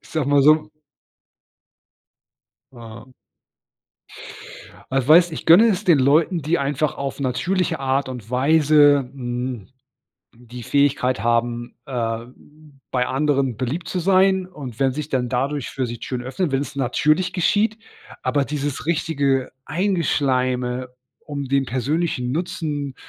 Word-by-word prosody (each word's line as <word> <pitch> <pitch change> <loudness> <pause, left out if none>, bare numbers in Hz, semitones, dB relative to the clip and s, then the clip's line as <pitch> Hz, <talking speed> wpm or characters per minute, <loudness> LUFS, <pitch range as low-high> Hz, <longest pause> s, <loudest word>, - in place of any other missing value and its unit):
ich - - -20
sage 155 -4 -1
mal 145 -1 +4
so 155 +1 +4 2.0
Ah. 115 +1 -12 1.8
Ah, 135 -1 +1
weißt, 170 +2 +6
ich - - -6
gönne 170 +7 +7
es 205 -1 -1
den 170 -6 +5
Leuten, 155 +6 +3
die 160 +4 0
einfach 145 +2 -1
auf 140 0 -5
natürliche 150 +8 -1
Art 135 0 -1
und 120 -4 -8
Weise, 145 0 +4
hm, 125 -4 -5 0.7
die 120 0 -11
Fähigkeit 135 -4 +1
haben, 120 0 -1
äh, 115 -3 -3
b 150 +4 -20 0.2
bei 125 -1 0
anderen 135 -3 0
beliebt 150 +7 -3
zu 185 - -2
sein 190 0 +3
und 140 -10 -10
wenn 135 -1 +2
sich 150 +2 -5
dann 125 -2 -1
dadurch 135 +3 -2
für 130 -2 -3
sie 120 0 -6
Türen 125 +1 -5
öffnen, 145 +6 -2
wenn's 135 +1 -2
natürlich 155 +7 +1
geschieht, 210 +4 +1 0.4
aber 145 -1 +1
dieses 145 -2 -4
richtige 140 -5 0
Eingeschleime, 130 -8 0 0.4
um 145 -2 -5
den 135 0 0
persönlichen 130 +1 -1
Nutzen 150 -4 -3
140 Hz, 130 wpm, -21 LUFS, 125-155 Hz, 2.0 s, gönne